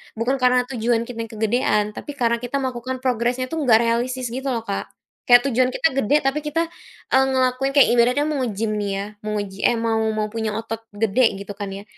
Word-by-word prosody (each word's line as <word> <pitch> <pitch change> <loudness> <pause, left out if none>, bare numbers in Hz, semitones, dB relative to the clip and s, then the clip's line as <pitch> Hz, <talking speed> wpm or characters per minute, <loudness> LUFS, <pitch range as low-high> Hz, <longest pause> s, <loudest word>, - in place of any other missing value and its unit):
bukan 235 +4 0
karena 250 0 +3
tujuan 235 -1 0
kita 235 -1 -8
yang - - -17
kegedean. 215 -1 +1
Tapi 290 +6 -8
karena 235 -3 +1
kita 265 +3 -3
melakukan 255 0 -4
progresnya 250 +1 0
itu 325 - -2
enggak 235 -5 +4
realistis 240 +1 -1
gitu 265 +2 -4
loh, 235 -4 -1
Kak. 200 -3 -4 0.4
Kayak 245 0 +7
tujuan 250 +2 +3
kita 260 +5 +1
gede 270 +6 +2
tapi 270 +2 +1
kita, 300 +2 -1 0.5
eee, 265 0 +5
ngelakuin 260 +1 +1
kayak 280 - +7
ibaratnya 245 +4 +3
mau 300 -2 -1
nge-gym 215 0 -2
ya, 205 +1 -4
mau 215 0 -4
ngeji 195 -1 -4
eh, 240 - +2
mau 225 -1 0 0.2
mau 215 0 -1
punya 220 -2 -3
otot 225 0 -4 0.2
gede 225 +1 +2
gitu 200 +1 -7
kan 195 -1 -4
ya. 200 - -8
240 Hz, 205 wpm, -22 LUFS, 220-255 Hz, 0.5 s, Kayak